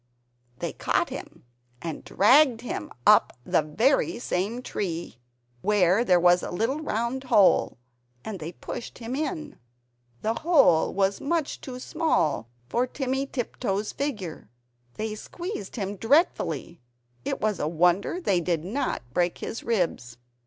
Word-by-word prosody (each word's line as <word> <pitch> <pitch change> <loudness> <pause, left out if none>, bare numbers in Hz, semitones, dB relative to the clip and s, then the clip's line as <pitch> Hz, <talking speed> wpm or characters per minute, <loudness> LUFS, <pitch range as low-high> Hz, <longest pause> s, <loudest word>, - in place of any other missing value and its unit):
They - - -4
caught - - 0
him - - -9 0.3
and 165 -3 -5
dragged 250 +3 +5
him 245 - -5
up - - +5
the - - +3
very 235 - +1
same 230 +2 -2
tree, 170 - -4 0.4
where 205 +1 +3
there 180 -6 +4
was 175 0 +5
the - - -4
little 230 +11 -1
round 260 -2 -2
hole, 205 -6 +4 0.5
and 210 -4 -5
they 160 +1 -5
pushed 235 - -7
him 235 +2 -5
in. 305 0 -4 0.6
The 225 +1 0
hole 305 - +5
was 195 0 0
much 320 0 -1
too 255 -2 -7
small 250 - 0 0.2
for 240 - 0
Timmy 270 +1 -2
Tiptoes' 215 -5 -2
figure. 205 - -4 0.5
They 215 0 -3
squeezed 340 - -6
him 200 -3 -3
dreadfully, 225 - +1 0.4
it - - -2
was 215 -3 0
a 150 - 0
wonder 175 - +2
they 195 - +1
did 165 -2 -1
not 225 - -2
break 175 +2 +1
his 230 - -5
ribs. 170 - -1
215 Hz, 140 wpm, -26 LUFS, 180-265 Hz, 0.6 s, dragged